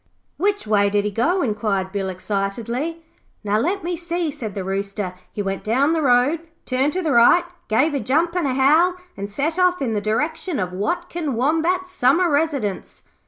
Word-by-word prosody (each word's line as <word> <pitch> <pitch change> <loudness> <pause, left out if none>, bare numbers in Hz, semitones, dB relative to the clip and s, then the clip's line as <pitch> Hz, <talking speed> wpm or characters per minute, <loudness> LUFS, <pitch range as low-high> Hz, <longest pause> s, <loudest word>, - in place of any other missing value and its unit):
'Which 410 +1 0
way 205 -1 +3
did 205 0 +1
he 210 - -1
go?' 330 - +1
inquired 210 -4 -1
Bill 195 -1 -2
excitedly. 230 - -3 0.4
'Now, 210 +1 +1
let 370 - -1
me 350 +1 -2
see,' 340 -1 -2
said 220 -7 -6
the 195 - -3
Rooster. 195 0 -3 0.2
'He 205 - -3
went 195 0 -3
down 270 +8 +2
the 325 - +1
road, 260 +4 +3 0.3
turned 265 +3 0
to 370 - -2
the 315 - 0
right, 240 +9 +6 0.2
gave 270 +8 +2
a 280 - 0
jump 320 +7 +1
and 350 -5 +1
a 255 - -1
howl, 310 +7 +4 0.2
and 200 0 -5
set 300 - -2
off 360 0 +3
in 245 -5 -1
the 210 - -1
direction 300 - -1
of 180 -2 -2
Watkin 320 - -2
Wombat's 330 +8 +1
summer 330 +3 +3
residence.' 285 - -1
265 Hz, 185 wpm, -21 LUFS, 210-335 Hz, 0.4 s, right